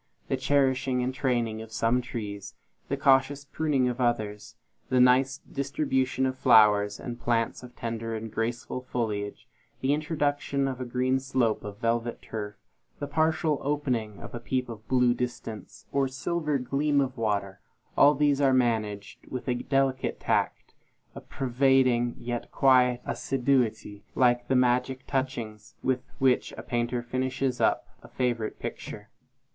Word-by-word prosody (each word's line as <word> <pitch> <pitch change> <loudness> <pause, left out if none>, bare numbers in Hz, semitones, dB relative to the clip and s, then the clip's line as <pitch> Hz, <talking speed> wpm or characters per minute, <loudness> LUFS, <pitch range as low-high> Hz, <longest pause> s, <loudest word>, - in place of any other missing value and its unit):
The - - +2
cherishing 130 -2 +1
and 130 +1 -1
training 120 -4 -1
of 110 0 -10
some 115 +3 +1
trees; 105 -5 -6 0.3
the 140 - 0
cautious 140 +1 +3
pruning 140 -3 0
of 125 +1 -2
others; 105 -4 -1 0.3
the 130 - +3
nice 130 +2 +4
distribution 135 -2 -1
of 130 0 -2
flowers 105 -5 +5
and 120 -1 -6
plants 115 -1 0
of 125 -1 -12
tender 115 -1 -4
and 110 0 -6
graceful 120 +3 -2
foliage; 105 -5 -3 0.3
the 135 +2 +1
introduction 145 -2 0
of 130 -1 -4
a - - -3
green 130 +2 +1
slope 130 -4 0
of 105 -1 -7
velvet 115 +1 -1
turf; 105 -2 -6 0.4
the 145 - -4
partial 155 0 +1
opening 130 -7 -1
to - - -9
a - - -4
peep 125 +1 -2
of 110 -1 -9
blue 125 -2 +4
distance, 120 -3 -6
or 140 -1 +2
silver 150 +2 -1
gleam 140 +3 +1
of 135 -2 0
water; 100 -4 -1 0.4
all 145 +1 +6
these 145 0 +2
are 135 -2 +4
managed 110 -5 -1
with 130 0 -6
a 125 - +2
delicate 135 +1 0
tact, - - -1 0.4
a - - -9
pervading 130 -2 +2
yet 120 0 -5
quiet 125 -2 +4
assiduity, 125 -6 0
like 120 -1 +3
the 135 - +2
magic 125 +1 +1
touchings 120 -6 -3
with 130 -1 +1 0.2
which 130 -2 +2
a - - -7
painter 120 0 -1
finishes 130 +1 -1
up - - +2 0.2
a - - -13
favorite 120 -4 -2
picture. - - -7
125 Hz, 150 wpm, -27 LUFS, 115-135 Hz, 0.4 s, all